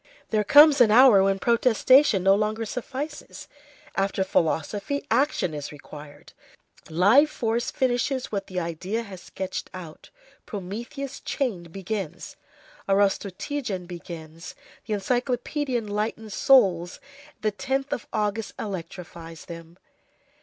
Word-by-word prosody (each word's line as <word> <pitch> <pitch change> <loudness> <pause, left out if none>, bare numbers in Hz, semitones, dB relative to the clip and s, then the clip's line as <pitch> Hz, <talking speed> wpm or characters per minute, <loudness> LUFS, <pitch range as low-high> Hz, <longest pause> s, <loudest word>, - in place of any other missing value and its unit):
There 215 -1 +2
comes 290 +5 +7
an 235 - +7
hour 230 -2 +7
when 195 0 +2
protestation 235 0 +4
no 195 +1 +6
longer 215 +2 0
suffices; 270 +6 -6 0.5
after 195 0 0
philosophy, 190 - -1
action 275 - +1
is 145 -1 -6
required; 145 0 -12 0.6
live 205 - +5
force 235 -3 -1
finishes 255 +1 -1
what 200 -2 -3
the 185 -1 -3
idea 180 +7 -3
has 190 -5 -10
sketched 190 +1 -6
out; 165 -4 -10 0.4
Prometheus 235 +8 -6
chained 190 - -3
begins, 190 -2 -5 0.5
Arostogeiton 195 +2 -1 0.2
ends; 165 0 -9 0.3
the 215 - -1
encyclopedia 250 +5 -1
enlightens 215 0 -3
souls, 190 -10 +3 0.4
the 215 - +1
10th 270 +5 -2
of 230 - -4
August 215 0 -2
electrifies 170 -4 -7
them. 170 0 -11
205 Hz, 110 wpm, -25 LUFS, 180-245 Hz, 0.6 s, comes